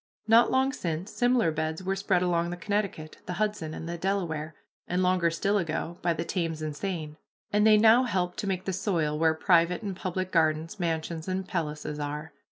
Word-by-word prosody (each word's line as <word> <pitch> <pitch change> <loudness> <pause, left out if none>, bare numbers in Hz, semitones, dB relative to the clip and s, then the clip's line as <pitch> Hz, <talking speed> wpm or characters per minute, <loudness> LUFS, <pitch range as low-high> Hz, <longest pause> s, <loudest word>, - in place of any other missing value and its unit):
Not 230 +2 +6
long 265 +1 +2
since, 175 0 -4
similar 245 -7 +2
beds 160 +2 -3
were 190 +1 0
spread 190 -2 +1
along 170 -1 +1
the 175 - -5
Connecticut, 195 -5 -3
the 180 - -3
Hudson, 205 -5 -2
and 165 - -6
the 170 0 -5
Delaware, 165 -5 -2 0.3
and 180 +1 0
longer 180 -2 +3
still 200 +5 +1
ago, 170 0 -3
by 175 - +1
the 165 0 -2
Thames 165 -3 -2
and 155 -1 -3
Seine, 155 -4 -4 0.4
and 210 +1 +4
they 215 -1 +7
now 225 +4 +6
help 180 -5 -1
to 205 - -3
make 185 -1 -2
the 190 - -1
soil 165 -6 0
where 160 -1 +3
private 170 +3 +3
and 200 -3 -3
public 185 0 -3
gardens, 160 +2 +1
mansions, 165 -1 -2
and 190 0 -2
palaces 150 -5 -3
are. 150 +1 -5
175 Hz, 195 wpm, -28 LUFS, 160-195 Hz, 0.4 s, they